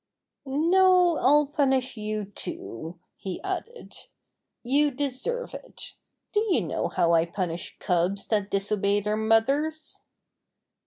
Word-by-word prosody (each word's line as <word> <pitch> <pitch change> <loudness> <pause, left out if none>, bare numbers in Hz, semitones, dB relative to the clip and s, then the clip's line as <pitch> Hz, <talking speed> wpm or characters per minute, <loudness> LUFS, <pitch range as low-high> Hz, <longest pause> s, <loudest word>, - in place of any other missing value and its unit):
"No, 355 +4 +4
I'll 295 +3 +5
punish 265 -3 0
you 215 -1 -3
too," 175 - -7 0.2
he 190 -2 -5
added. 385 +6 -5 0.7
"You 285 +4 +3
deserve 285 - -2
it. - - -8 0.4
Do 415 - +3
you 360 - +3
know - - -2
how 170 0 +2
I 165 0 +3
punish 175 -2 -4
cubs 180 +3 0
that 205 -2 +1
disobey 200 0 +1
their 210 +1 -1
mothers 270 +9 +1
245 Hz, 115 wpm, -26 LUFS, 200-300 Hz, 0.7 s, I'll